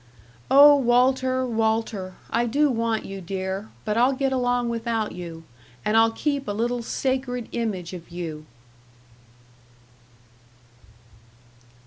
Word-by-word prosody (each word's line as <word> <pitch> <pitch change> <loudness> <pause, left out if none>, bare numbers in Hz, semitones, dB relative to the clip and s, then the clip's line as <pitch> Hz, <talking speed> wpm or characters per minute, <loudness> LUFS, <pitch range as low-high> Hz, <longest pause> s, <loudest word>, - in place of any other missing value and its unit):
"Oh, 285 +1 +8
Walter, 255 +1 +2
Walter, 220 -5 -1 0.2
I 235 +1 +1
do 285 +4 +2
want 230 -2 -1
you, 195 0 -7
dear, 190 +3 -4 0.2
but 215 0 -1
I'll 250 +3 +4
get 270 0 -1
along 245 -1 +1
without 230 -2 -2
you, 170 -2 -8 0.4
and 210 - +1
I'll 225 0 +6
keep 280 +4 -2
a 205 - -1
little 240 +3 -1
sacred 250 0 -2
image 200 -7 -3
of 175 -2 -9
you." 160 -3 -6
230 Hz, 115 wpm, -24 LUFS, 195-255 Hz, 0.4 s, Oh